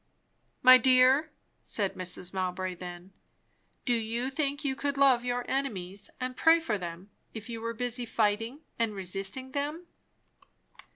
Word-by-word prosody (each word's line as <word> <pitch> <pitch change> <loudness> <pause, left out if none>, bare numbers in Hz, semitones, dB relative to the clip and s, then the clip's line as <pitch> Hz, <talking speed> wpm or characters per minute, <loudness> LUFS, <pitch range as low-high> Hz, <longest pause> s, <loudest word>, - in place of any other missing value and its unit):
"My 255 0 +10
dear," 260 +5 +5 0.3
said 200 -3 0
Mrs. 180 0 -5
Mowbray 185 0 -2
then, 180 +1 -9 0.7
"do 245 - +2
you 235 +3 -1
think 285 0 -2
you 265 -1 0
could 285 +1 -2
love 265 -3 +5
your 245 0 -2
enemies 200 -8 -3
and 255 0 -3
pray 325 +4 +5
for 225 -11 -2
them, 175 +3 -7 0.2
if 220 +1 -7
you 230 -1 -5
were 230 0 -3
busy 245 0 -3
fighting 225 +5 0 0.2
and 225 -2 0
resisting 195 +7 -4
them?" 295 +5 -3
235 Hz, 140 wpm, -29 LUFS, 195-265 Hz, 0.7 s, My